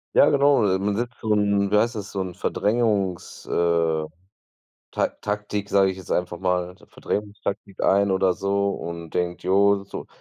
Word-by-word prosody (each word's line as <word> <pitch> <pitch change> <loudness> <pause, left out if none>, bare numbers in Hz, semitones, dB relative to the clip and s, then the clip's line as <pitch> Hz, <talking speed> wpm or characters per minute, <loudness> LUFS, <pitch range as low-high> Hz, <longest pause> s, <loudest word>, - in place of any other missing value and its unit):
Ja - - +7
genau, 140 -1 +4 0.2
man 100 +1 -1
setzt 120 +2 -3
so 110 - -1
'n 100 -1 +1
wie 105 - +4
heißt 115 +3 +2
das, 100 -2 -6
so 100 - -4
'n 95 -1 -3
Verdrängungs 105 -5 -1
äh, 85 -2 +1 0.9
Ta 290 - 0
Taktik, 105 -1 -3
sage 100 -1 +4
ich 95 - -7
jetzt 95 - -11
einfach 90 -1 -1
mal, 90 -1 -1
so - - -19
Verdrängungstaktik 100 -1 -5
ein 100 0 +3
oder 95 -1 +2
so 100 +2 0
und 85 -3 -6
denkt: 90 0 -2
„Jo, 100 +1 +3
so 100 - -8
100 Hz, 170 wpm, -24 LUFS, 90-105 Hz, 0.9 s, Ja